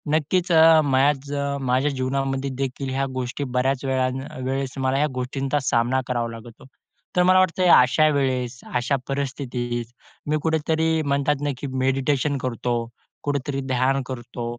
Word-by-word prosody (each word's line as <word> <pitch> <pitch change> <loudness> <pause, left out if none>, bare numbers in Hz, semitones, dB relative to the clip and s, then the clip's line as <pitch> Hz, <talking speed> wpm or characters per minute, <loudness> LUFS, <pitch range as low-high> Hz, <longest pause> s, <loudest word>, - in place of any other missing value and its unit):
नक्कीच 175 +4 0
अ, 160 -1 +7
माझ 140 +1 +1 0.4
माझ्या 135 +4 +2
जीवनामध्ये 135 +1 -2
देखील 135 0 -3
ह्या 135 0 +1
गोष्टी 125 +3 -3
बऱ्याच 135 +1 0
वेळा 130 -1 +1 0.4
वेळेस 135 0 -2
मला 130 +1 +1
ह्या 150 +1 +2
गोष्टींचा 135 +3 -1
सामना 120 +3 +2
करावा 120 -2 -1
लागतो. 115 +2 -12 0.5
तर 180 - +4
मला 185 +1 +5
वाटतं 185 0 +2
या 175 - +7
अशा, 145 +5 +3
वेळेस 130 -3 -1 0.2
अशा 125 +3 +1
परिस्थितीत 125 -3 -3 0.4
मी 155 - +2
कुठेतरी 160 0 +1
म्हणतात 140 0 0
ना 145 - 0
की 140 - -5 0.2
मेडिटेशन 135 +2 +1
करतो. 120 -1 -1 0.5
कुठेतरी 140 -1 -2
ध्यान 130 +2 +2
करतो, 120 -2 -6
135 Hz, 145 wpm, -23 LUFS, 130-145 Hz, 0.5 s, अ